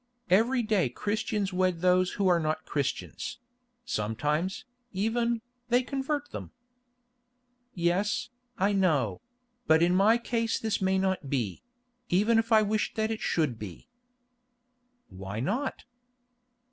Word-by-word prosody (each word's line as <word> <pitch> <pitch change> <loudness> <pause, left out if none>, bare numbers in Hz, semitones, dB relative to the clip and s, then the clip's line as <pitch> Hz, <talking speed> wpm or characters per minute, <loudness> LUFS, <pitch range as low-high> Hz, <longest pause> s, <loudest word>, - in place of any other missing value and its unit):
Every 235 +6 +4
day 210 - +2
Christians 205 - -2
wed 180 -2 +1
those 180 0 +3
who 200 -2 +1
are 175 -2 +4
not 155 0 -2
Christians; 140 - -3 0.5
sometimes, 150 - -1 0.3
even, 230 +3 0 0.3
they 245 +1 +4
convert 285 +2 -3
them." - - -6 1.3
"Yes, 185 +6 0 0.3
I 200 +2 +2
know; 180 -8 +1 0.5
but 160 +1 +5
in 175 +1 +3
my 205 +5 +5
case 230 -1 -1
this 220 -3 -1
may 190 0 +2
not 190 -7 -1
be—even 230 - -1
if 225 +1 -2
I 220 -1 +6
wished 210 +1 -1
that 220 0 0
it 220 - -3
should 145 -9 0
be." 105 - -9 1.2
"Why 95 +2 -6
not?" 240 - -2
195 Hz, 120 wpm, -29 LUFS, 165-230 Hz, 1.3 s, I